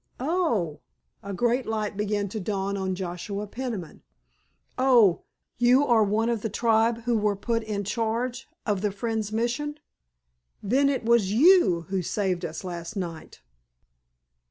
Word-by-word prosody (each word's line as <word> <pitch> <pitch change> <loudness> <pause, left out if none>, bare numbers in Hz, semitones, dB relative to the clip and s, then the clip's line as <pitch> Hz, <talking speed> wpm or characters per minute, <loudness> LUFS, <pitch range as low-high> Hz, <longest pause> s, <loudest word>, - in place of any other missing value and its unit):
"Oh 255 - 0
h!" 200 - -17
A - - -2
great 240 +6 0
light 215 -2 -2
began 205 0 -1
to 215 - -4
dawn 200 0 -2
on 190 -1 -2
Joshua 185 +3 -4
Peniman. 215 -6 -6 0.7
"Oh, 245 -8 +4 0.4
you 250 +4 +5
are 235 -5 +4
one 210 +3 +1
of 235 -3 0
the 225 - -2
tribe 230 +1 +2
who 240 0 +1
were 210 -1 +1
put 230 +3 -1
in 210 -2 -3
charge 230 +4 -2 0.2
of 205 -4 0
the 210 -1 0
Friends' 215 +1 -3
Mission?[#] 245 +7 -2 0.9
Then 270 +7 +3
it 265 -4 -2
was 230 -4 +3
you 290 - +5
who 190 -1 0
saved 185 -1 -1
us 165 +1 -5
last 170 +1 -6
night?" 170 - -6
215 Hz, 150 wpm, -26 LUFS, 195-240 Hz, 0.9 s, you